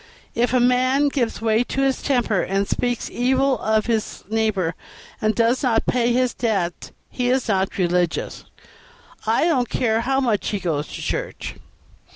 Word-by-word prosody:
If 240 0 +1
a 255 - +3
man 255 +3 +3
gives 240 -5 -2
way 220 +1 +3
to 270 - -2
his 270 -1 +1
temper, 240 -8 +1
and 195 +1 -1
speaks 245 -1 -1
evil 260 0 +1
of 220 0 +1
his 225 -2 -2
neighbor, 210 -6 0 0.5
and 215 0 +1
does 235 +2 +2
not 235 -4 +1
pay 240 -1 +2
his 250 0 +1
debts, 195 -8 -2 0.2
he 245 -1 -1
is 255 0 +1
not 195 -2 0
religious, 175 -2 -1 0.8
I 225 +8 +3
don't 260 -8 +1
care 225 -2 +1
how 265 +3 +1
much 230 -7 0
he 205 - -2
goes 155 -5 -2
to - - -8
church. - - -4
230 Hz, 165 wpm, -22 LUFS, 210-255 Hz, 0.8 s, a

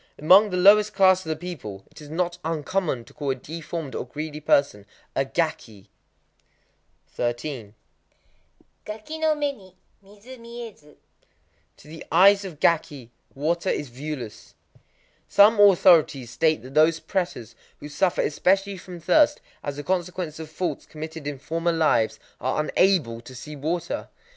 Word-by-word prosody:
—Among 190 +8 +6
the 180 - -2
lowest 205 +3 +6
classes 185 -3 +4
of - - -4
the 155 - 0
people 105 - -7
it - - -14
is 150 - -11
not 175 +2 -2
uncommon 160 -4 -2
to - - -18
call 145 -2 -4
a 135 - +1
deformed 155 +1 -7
or - - -3
greedy 150 +4 -6
person 140 -9 +1 0.3
a 135 - +2
"gaki." 120 - -3 1.2
13.—Gaki 135 - -8
no 315 -1 +2
mé 290 -2 -1
ni 185 -4 -18 0.3
midzu 210 +6 -14
miézu. 230 -10 -11 0.8
To - - -18
the 160 +1 -10
eyes 195 +4 +6
of 175 -6 -8
gaki 145 -8 0 0.2
water 170 +6 -1
is 145 - -2
viewless. 125 -4 -8 0.7
Some 205 +2 +5
authorities 170 - +5
state 155 +1 +1
that 130 +1 -11
those 155 +2 +4
prêtas 180 - -3 0.3
who - - -8
suffer 160 +5 0
especially 195 +5 +1
from 180 0 -10
thirst, 295 - +3 0.2
as 145 -1 -5
a 145 - -5
consequence 175 -2 -3
of 160 -1 -7
faults 175 +4 -4
committed 155 -1 -8
in 145 -1 -4
former 165 +4 -1
lives, 155 -9 +1 0.2
are - - -1
unable 150 -7 +1
to 130 +2 -12
see 150 +4 -9
water. 165 +4 -3
160 Hz, 145 wpm, -24 LUFS, 145-190 Hz, 1.2 s, Among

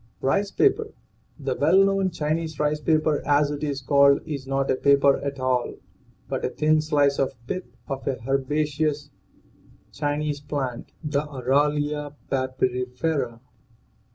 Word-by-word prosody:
RICE 200 +9 +1
PAPER. 430 - +1 0.4
The - - -2
well 195 +1 +5
known 195 -1 +2
Chinese 160 -1 -2
rice 150 0 +1
paper, 155 -1 +2
as 145 0 +3
it 145 0 -5
is 140 -2 -2
called, 140 +1 +5
is 140 -4 -5
not 135 0 0
a - - +2
paper 140 +1 +4
at 140 -1 -4
all 130 -1 0 0.5
but - - -3
a - - +1
thin 155 0 +2
slice 145 -2 +2
of 135 - +1
the 185 +8 -3
pith - - -29
of 135 -1 -5
a 135 - 0
herbaceous 150 +2 0 0.8
Chinese 145 0 -2
plant 140 -4 -4
(the 145 -2 0
Aralia 145 +1 0 0.2
papyrifera). 130 0 -1
145 Hz, 140 wpm, -24 LUFS, 135-155 Hz, 0.8 s, well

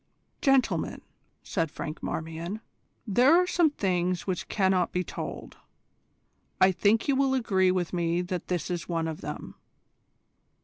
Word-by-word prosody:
"Gentlemen," 270 -2 +2 0.4
said 165 -4 -1
Franklin 155 +1 -6
Marmion, 165 +6 -4 0.4
"there 250 - +5
are 360 - +3
some 350 -3 +3
things 180 -8 -1
which 185 -3 -3
cannot 190 -3 +1
be 180 - 0
told. - - -7 1.0
I 190 - +6
think 205 +4 +2
you 280 - +3
will 265 0 +2
agree 190 -7 +2
with 180 -2 -1
me 170 0 0
that 180 -1 -4
this 180 -1 -2
is 175 0 -4
one 165 -1 -1
of 160 -1 -5
them. - - -6
185 Hz, 140 wpm, -28 LUFS, 175-225 Hz, 1.0 s, I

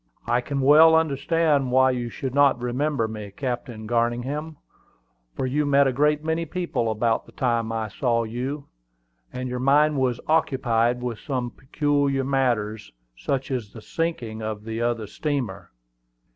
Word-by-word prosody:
"I 120 +1 +1
can 140 +2 -3
well 155 +4 +7
understand 150 -2 +1
why 130 +1 +5
you 120 -2 -3
should 130 +2 -5
not 140 -2 +4
remember 125 0 -1
me, 105 -2 -7
Captain 120 0 -5
Garningham, 120 +7 -1 0.8
for - - -2
you 145 +4 0
met 140 -1 +4
a 135 - +1
great 150 +3 +2
many 160 +1 -1
people 165 -8 -2
about 115 +1 0
the - - -15
time 115 -3 0
I 110 -1 -2
saw 115 +2 0
you, 130 +6 -4 0.7
and 130 0 -4
your 125 0 -3
mind 145 +2 +3
was 125 -2 0
occupied 125 -6 +1
with 120 -4 -3
some 125 -4 -3
peculiar 140 -1 0
matters, 120 -6 -1 0.2
such 130 - -3
as 120 -6 -3
the 110 - -10
sinking 120 -10 -3
of 110 -1 -4
the 115 +1 -4
other 120 -2 -1
steamer." 105 - -3
130 Hz, 155 wpm, -24 LUFS, 115-145 Hz, 0.8 s, well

